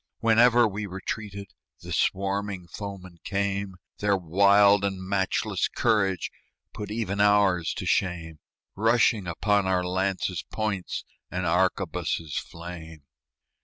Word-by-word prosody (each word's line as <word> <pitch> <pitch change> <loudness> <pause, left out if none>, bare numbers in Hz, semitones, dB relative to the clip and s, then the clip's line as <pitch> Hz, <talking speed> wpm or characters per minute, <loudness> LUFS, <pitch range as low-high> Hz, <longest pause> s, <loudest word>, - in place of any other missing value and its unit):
Whenever 120 +1 +5
we 105 0 -4
retreated 100 +1 -6 0.3
The - - -6
swarming 100 -1 -1
foemen 95 -2 -8
came 100 -1 -2 0.2
Their 100 -1 +2
wild 100 +3 +5
and 95 -1 -1
matchless 95 0 0
courage 100 -5 +1 0.4
Put 105 - -6
even 105 -2 -2
ours 100 -5 +3
to - - -5
shame 85 -4 -1 0.4
Rushing 115 -2 +3
upon 100 +3 +1
our 90 -1 +1
lances' 95 0 -1
points, 105 -4 -3 0.2
And 90 0 -3
arquebuses' 85 -3 0
flame. 85 -2 -10
100 Hz, 110 wpm, -26 LUFS, 90-105 Hz, 0.4 s, Whenever